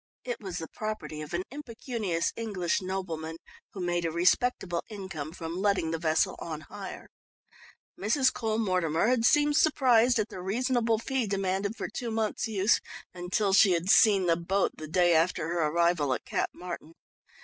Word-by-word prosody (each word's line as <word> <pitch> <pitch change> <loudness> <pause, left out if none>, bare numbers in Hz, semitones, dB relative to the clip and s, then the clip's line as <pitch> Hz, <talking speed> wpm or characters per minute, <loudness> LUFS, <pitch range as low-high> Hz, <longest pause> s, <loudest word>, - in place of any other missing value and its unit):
It 245 -1 -4
was 190 -4 -5
the 160 - -5
property 170 -9 -5
of 150 - -8
an 180 - -1
impecunious 230 - -3
English 200 -5 -1
nobleman 170 -4 -4 0.4
who 195 - -8
made 175 -1 0
a 165 - 0
respectable 175 +1 +1
income 190 -8 -6
from 165 0 -6
letting 195 -5 +1
the 165 - -2
vessel 160 -1 +1
on 155 -2 -5
hire. 190 +6 -9 0.9
Mrs. 260 +7 +2
Cole 220 -2 -1
Mortimer 185 -3 +1
had 245 -2 +2
seemed 295 +2 +4
surprised 255 -6 +4
at 215 0 0
the 185 - -8
reasonable 230 +3 +1
fee 255 +1 -1
demanded 195 +1 -1
for - - -4
two 240 - -5
months' 220 -1 -1
use 210 0 +2 0.3
until 185 +3 0
she 195 -1 +6
had 175 +3 +1
seen 200 -4 +5
the 170 -1 +3
boat 185 +4 0
the 155 - -8
day 175 +1 +3
after 165 0 +1
her 170 -2 +1
arrival 165 -4 +2
at - - -8
Cap - - -1
Martin. 170 -2 -8
190 Hz, 170 wpm, -28 LUFS, 170-225 Hz, 0.9 s, she